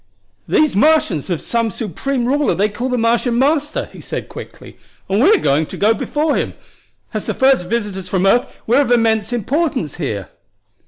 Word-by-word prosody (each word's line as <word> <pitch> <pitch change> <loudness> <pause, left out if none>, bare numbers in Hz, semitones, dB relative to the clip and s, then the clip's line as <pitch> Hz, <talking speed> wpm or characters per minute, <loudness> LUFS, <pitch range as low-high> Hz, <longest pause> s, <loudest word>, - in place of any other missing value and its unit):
"These 305 -7 +2
Martians 245 - +2
have 175 -4 -2
some 230 -1 -1
supreme 235 - -3
ruler 285 +3 +1
they 205 +2 +1
call 240 +5 -4
the 250 - 0
Martian 235 +1 +1
Master," 295 +3 +1
he - - -11
said - - -6
quickly; - - -11 0.3
"and 200 +3 +1
we're 405 - +6 0.3
to - - -8
go 215 +2 +3
before 295 +7 -1
him. - - -2 0.6
As - - -4
the - - -2
first 265 -9 +3
visitors 195 -4 -3
from 190 0 0
earth 235 +5 +1
we're 245 +5 +4
of 270 - -1
immense 225 -2 +2
importance 250 - -1
here." 105 - -4
235 Hz, 170 wpm, -18 LUFS, 200-275 Hz, 0.6 s, we're